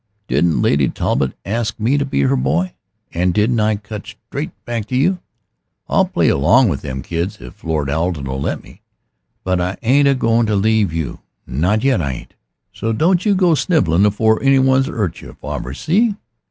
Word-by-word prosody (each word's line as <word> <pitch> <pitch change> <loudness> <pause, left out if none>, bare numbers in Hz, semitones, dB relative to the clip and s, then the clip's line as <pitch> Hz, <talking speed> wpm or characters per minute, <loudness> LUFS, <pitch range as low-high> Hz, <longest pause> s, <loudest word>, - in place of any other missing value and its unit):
Didn't 85 -2 +1
Lady 70 -2 +2
Talbot 65 -1 -1
ask 115 +3 -2
me 115 +6 +2
to 140 -1 +1
be 100 - -1
her 70 0 +2
boy 75 +8 0 0.4
and 90 +1 0
didn't 110 +3 +2
I 110 0 +2
cut 105 0 -8
straight - - -6 0.2
back 115 -3 -3
to 125 - -3
you? 180 +8 +2 0.7
I'll - - +3
play - - 0
along 115 - +4
o' - - 0
them 65 -2 -6
kids 85 +5 -3
if 60 - -13
Lord 80 -3 -1
Arden'll 70 -3 -2
let - - -3
me. - - -17 0.6
But 90 -1 0
I 90 +2 -2
ain't 140 +4 +4
a 140 - +4
goin' 115 -2 +2
to 105 - +1
leave 105 -2 +2
you, 80 -3 -4 0.3
not 95 - 0
yet 135 -9 +2
I 70 -4 -2
ain't. - - -10 0.4
So 115 0 -2
don't 175 - +2
you 205 - +4
go 180 -3 +3
snivelling 105 - +2
afore 110 +2 +2
any 135 0 +4
one's 130 0 +3
'urt 95 -7 -3
yer, - - -11
farver. 65 +2 -6
See?" 205 - +1
105 Hz, 190 wpm, -18 LUFS, 80-130 Hz, 0.7 s, along